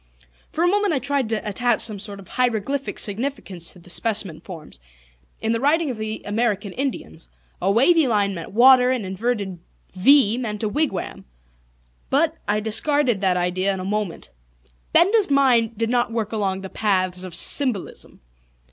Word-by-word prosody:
For 330 - -1
a - - +3
moment 405 -2 +1
I - - +1
tried 275 -2 -1
to 220 -1 -2
attach 240 +2 0
some 215 -3 -2
sort 200 0 -8
of 195 - -13
heiroglyphic 250 +3 -2
significance 205 -6 -1
to - - -13
the 180 0 -17
specimen 205 -6 -1
forms; 160 - -11 0.6
in 220 - -1
the 230 - 0
writing 295 +3 +1
of 240 - -7
the 220 0 -5
American 205 -2 -1
Indians, 80 - -5 0.3
a 190 - +1
wavy 285 - +4
line 205 -4 +1
meant 165 -3 -8
water, 250 +3 +6
an 255 -5 -1
inverted 195 -1 -3 0.3
V 235 +3 +4
meant 215 -3 -4
a 215 - 0
wigwam. 290 -5 -3 0.8
But, 310 +3 +1
I 210 +1 0
discarded 240 +1 +1
that 185 -2 +2
idea 185 +2 0
in - - -7
a 185 - -5
moment. 205 - -4 0.6
Benda's 395 +4 +3
mind 245 -6 +2
did 225 +1 -1
not 240 -2 +1
work 225 -2 -3
along 195 -3 -2
the 190 - -8
paths 185 -3 -1
of 180 -3 -7
symbolism. 245 0 0
220 Hz, 165 wpm, -22 LUFS, 195-260 Hz, 0.8 s, water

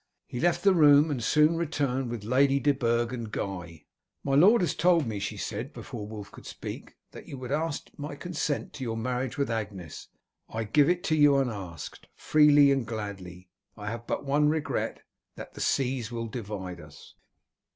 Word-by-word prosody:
He 125 - -6
left 175 +4 +1
the 195 -1 +6
room, 150 -2 +6
and 125 -5 -2
soon 150 +6 +4
returned 140 -6 -1
with 115 -3 -5
Lady 135 +4 +3
de 145 +1 +3
Burg 120 -3 0
and 115 -3 -5
Guy. 85 -7 -5 0.4
"My 135 - -1
lord 190 +11 +6
has 170 -5 +1
told 170 -4 +3
me," 110 -3 -3
she 100 - -4
said, - - -5
before 105 - -7
Wulf 105 -2 -8
could - - -13
speak, - - -8 0.2
"that - - -12
you 140 - -7
would 130 0 -7
ask 155 +1 -2
my 145 0 -6
consent 155 -3 -3
to 135 - -6
your 115 -2 -3
marriage 125 +2 -2
with 140 -4 0
Agnes. 100 -8 -5 0.4
I 115 +1 -3
give 140 +8 +3
it 175 -1 0
you 145 -2 +5
unasked, 100 - -4
freely 145 -2 +5
and 135 -2 +1
gladly. 95 -5 -7 0.3
I 105 0 -5
have 115 0 -7
but - - -2
one 145 +2 +3
regret 155 -1 -2 0.3
that - - -9
the - - -8
seas 125 -3 0
will 115 -1 -3
divide 100 -6 -6
us." 75 -1 -14
125 Hz, 185 wpm, -28 LUFS, 110-145 Hz, 0.4 s, the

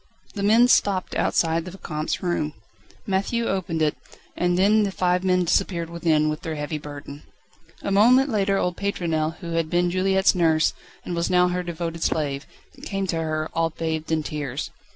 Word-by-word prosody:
The 205 - -4
men 225 +4 +5
stopped 195 -6 +2
outside 165 0 +1
the 185 - -7
Vicomte's 160 -3 -4
room. 165 -4 -1 0.5
Matthieu 205 +4 0
opened 180 -5 -1
it, 150 - +1 0.4
and 175 0 +1
then 210 +3 +4
the 205 - +1
five 180 -1 0
men 185 -1 +2
disappeared 170 -1 0
within, 160 -3 +2
with 155 0 -2
their 160 -1 -4
heavy 150 +1 -4
burden. 145 0 -9 0.6
A 200 - -2
moment 250 +7 +5
later 200 -2 +1
old 180 -2 -1
Pétronelle, 165 -5 -1
who 170 - -6
had 165 -1 0
been 175 +1 +1
Juliette's 190 +1 +3
nurse, 160 -3 +2 0.3
and 175 - -3
was 170 0 -1
now 180 0 +4
her 180 0 -1
devoted 165 -1 -5
slave, 140 -3 -1 0.3
came 195 -1 -3
to 170 -3 -2
her, 155 -1 -2
all 165 0 +1
bathed 160 0 -4
in 160 -1 +1
tears. 145 -2 -4
175 Hz, 175 wpm, -24 LUFS, 155-190 Hz, 0.6 s, men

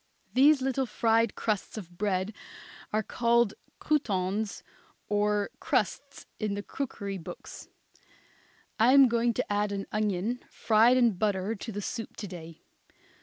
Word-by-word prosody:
These 275 +1 +5
little 265 0 0
fried 225 0 +2
crusts 215 0 -2
of 175 -4 -8
bread 195 0 0 0.6
are 215 +1 +1
called 235 -1 +2 0.2
croutons 205 -7 -1 0.4
or 205 0 +1
crusts - - -1
in 210 -2 -1
the 205 - -4
cookery 200 -8 -5
books. 165 - -9 1.1
I 235 +4 +6
am 275 -1 +8
going 235 0 +2
to - - -1
add 205 0 0
an 195 -1 -3
onion 215 +3 -1
fried 230 +3 +4
in 235 -6 +3
butter 205 0 0
to 225 +2 -7
the 205 0 -5
soup 225 +2 -5
to 205 - -5
day. 165 -3 -10
215 Hz, 135 wpm, -29 LUFS, 200-235 Hz, 1.1 s, am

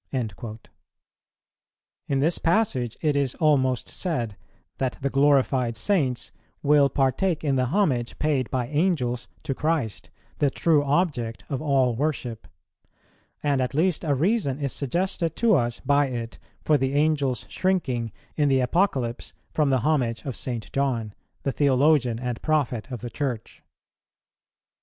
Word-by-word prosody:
"[141:1] 110 -3 -4 1.5
In 140 - 0
this 155 +5 +1
passage 165 - +1
it 150 -2 +2
is 140 -3 0
almost 130 -6 +2
said 120 - -2 0.4
that 130 -2 -1
the 140 0 -1
glorified 135 -4 +2
Saints 130 - 0 0.3
will 145 -1 +5
partake 150 +6 +1
in 140 -3 +1
the 130 -1 +2
homage 135 - 0
paid 145 -5 0
by 125 -2 -1
Angels 145 - 0 0.2
to - - -2
Christ, 145 - -2 0.3
the 145 - +3
True 150 +1 +2
Object 140 -7 0
of 140 -2 -2
all 135 -5 +2
worship; 125 -4 -3 1.0
and 140 -3 +2
at 130 +1 -2
least 175 +2 +1
a 145 -4 +1
reason 165 - +1
is 140 -2 -3
suggested 165 +3 -1
to 230 -2 +3
us 120 -7 +1
by 145 0 +3
it 120 -3 -5 0.2
for 150 -2 +3
the 135 +1 0
Angel's 145 -5 +1
shrinking 130 - -1 0.2
in 145 -2 +2
the 135 -1 +3
Apocalypse 130 -4 0 0.2
from 150 -3 +1
the 130 -2 +2
homage 120 -6 0
of 135 -4 -4
St. 120 -4 -4
John, 120 -6 -1 0.3
the 135 - 0
Theologian 135 -3 +3
and 125 -2 -4
Prophet 140 -6 0
of 125 - -5
the 120 -1 -6
Church. 125 -6 -4
135 Hz, 145 wpm, -25 LUFS, 125-150 Hz, 1.5 s, will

